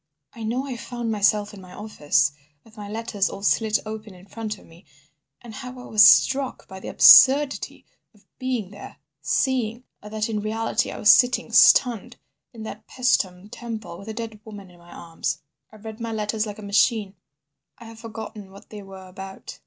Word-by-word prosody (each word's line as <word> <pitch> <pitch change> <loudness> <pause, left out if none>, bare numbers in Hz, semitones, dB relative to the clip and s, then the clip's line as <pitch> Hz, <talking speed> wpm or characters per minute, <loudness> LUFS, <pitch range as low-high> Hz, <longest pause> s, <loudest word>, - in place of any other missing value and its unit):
I 235 - -11
know 240 +5 -2
I 260 -3 -6
found 235 -1 -5
myself 210 0 +1
in 200 - -11
my 180 -1 -14
office, 150 -9 0 0.3
with 220 -1 -20
my 205 -2 -9
letters 220 -2 -2
all 200 - -9
slit 215 +1 +2
open 215 -2 -8
in 180 +1 -16
front 215 +1 -6
of - - -18
me, 165 +3 -18 0.6
and 235 -2 -11
how 255 +1 -9
I 250 - -10
was 215 -1 +5
struck 270 0 +4
by 190 - -10
the - - -10
absurdity 275 +1 +6 0.3
of 205 - -26
being 250 -7 -3
there, 205 - -12 0.2
seeing 245 -3 -1 0.2
that 215 +1 -4
in 220 -2 -3
reality 220 +2 -2
I - - -8
was 210 - +6
sitting, 250 +1 +2
stunned, 240 -1 +4 0.4
in 225 -3 -10
that 215 0 -9
Paestum 200 -7 0
Temple 220 -8 -7
with 200 - -12
a - - -5
dead 225 -2 -7
woman 205 -4 -11
in 175 - -20
my 170 0 -18
arms. 165 -2 -5 0.3
I - - -16
read 220 +1 -10
my 230 -1 -5
letters 215 0 -2
like 205 - -7
a 215 - -11
machine. 205 0 +1 0.6
I 235 - -13
have 225 0 -12
forgotten 220 -3 -9
what 195 +1 -16
they 210 -1 -8
were 190 -1 -12
about." 190 +1 -10
215 Hz, 190 wpm, -23 LUFS, 200-230 Hz, 0.6 s, absurdity